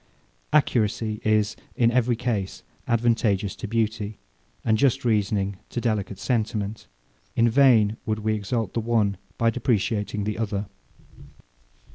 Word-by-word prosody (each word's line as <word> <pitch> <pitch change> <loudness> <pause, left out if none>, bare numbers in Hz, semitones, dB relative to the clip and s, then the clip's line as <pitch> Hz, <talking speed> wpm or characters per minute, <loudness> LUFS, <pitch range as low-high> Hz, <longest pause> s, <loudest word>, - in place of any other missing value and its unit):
Accuracy 110 -6 +1
is, 110 -1 +2 0.2
in 120 -3 +3
every 125 -1 +2
case, 110 -5 -3 0.2
advantageous 115 -4 +1
to - - -5
beauty, 110 -1 -1 0.5
and 110 - +3
just 135 0 +2
reasoning 100 -3 +1
to - - -3
delicate 105 -5 -1
sentiment. 110 -3 -2 0.5
In 115 - +4
vain 115 -4 +4
would 110 0 0
we 110 0 0
exalt 105 0 -2
the - - 0
one 110 -4 +1 0.2
by 115 0 +3
depreciating 110 -4 0
the 105 +2 -3
other. 105 -2 -2
110 Hz, 125 wpm, -25 LUFS, 105-115 Hz, 0.5 s, In